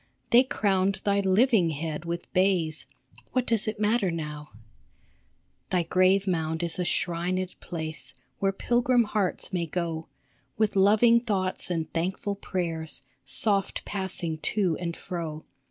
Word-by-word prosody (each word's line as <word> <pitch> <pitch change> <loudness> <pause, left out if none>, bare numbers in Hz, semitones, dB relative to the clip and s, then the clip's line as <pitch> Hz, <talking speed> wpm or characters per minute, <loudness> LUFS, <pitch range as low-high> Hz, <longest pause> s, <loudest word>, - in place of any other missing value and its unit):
They 240 - +8
crowned 195 -6 +1
thy 200 -1 +2
living 200 -1 +4
head 155 +1 -4
with 170 0 -5
bays; 180 -4 +1 0.5
What 255 -1 +1
does 230 -3 +1
it 215 0 -3
matter 210 -1 +2
now? 150 -3 -5 1.2
Thy 180 -2 +2
grave 185 +3 +3
mound 160 -2 -1
is 170 +1 -1
a 180 - 0
shrined 180 +2 -1
place, 160 -6 -5 0.2
Where 195 -1 +2
pilgrim 240 +4 +2
hearts 205 -3 -2
may 170 -2 0
go, 165 -1 -3 0.5
With 215 -1 +1
loving 215 +4 +5
thoughts 195 -7 -1
and 165 -3 -1
thankful 190 +4 -1
prayers, 170 -5 -4 0.2
Soft 195 +8 +1
passing 185 -5 -3
to 185 -2 +1
and 170 -1 -4
fro. 160 -3 -5
185 Hz, 135 wpm, -27 LUFS, 165-200 Hz, 1.2 s, They